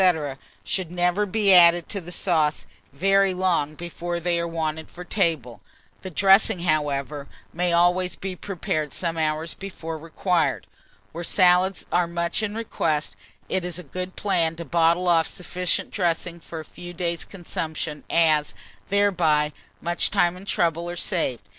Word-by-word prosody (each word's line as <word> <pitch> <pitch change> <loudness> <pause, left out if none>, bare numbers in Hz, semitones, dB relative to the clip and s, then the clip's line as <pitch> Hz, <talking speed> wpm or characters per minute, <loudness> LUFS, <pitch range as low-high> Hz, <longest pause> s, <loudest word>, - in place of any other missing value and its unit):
should 185 -4 -2
never 180 +4 +1
be 200 0 +3
added 175 -1 +7
to 200 - -3
the 175 +1 -9
sauce 160 -5 +1 0.3
very 195 +5 +3
long 170 -5 +1
before 175 +1 -4
they 170 0 0
are 170 - -1
wanted 160 -1 -3
for 180 - -9
table; 160 - -1 0.4
the 190 - -6
dressing, 190 0 +4
however, 145 -3 -1 0.3
may 175 +1 0
always 175 +2 +3
be 190 -1 -5
prepared 160 -6 -3
some 170 -2 -2
hours 155 0 -1
before 165 -5 -7
required. 165 -2 0 0.5
Where 170 +2 -6
salads 180 +1 +3
are 175 -1 +2
much 170 +3 -1
in 210 -1 -2
request, 155 -9 -1 0.3
it 185 - -1
is 175 -1 -3
a 180 - -6
good 180 +5 -6
plan 170 -5 +1
to 170 0 -7
bottle 170 +3 +2
off 165 -2 +4
sufficient 180 0 -2
dressing 170 -2 -1
for 165 0 -8
a 155 - -8
few 175 +3 -10
days' 170 -1 -2
consumption, 160 -4 -5
as, 155 -3 +3 0.3
thereby, 170 -7 +2 0.3
much 175 +1 +1
time 180 -3 +2
and 190 +2 -12
trouble 170 -2 0
are 175 - -4
saved. 165 - -1
170 Hz, 155 wpm, -24 LUFS, 160-185 Hz, 0.5 s, added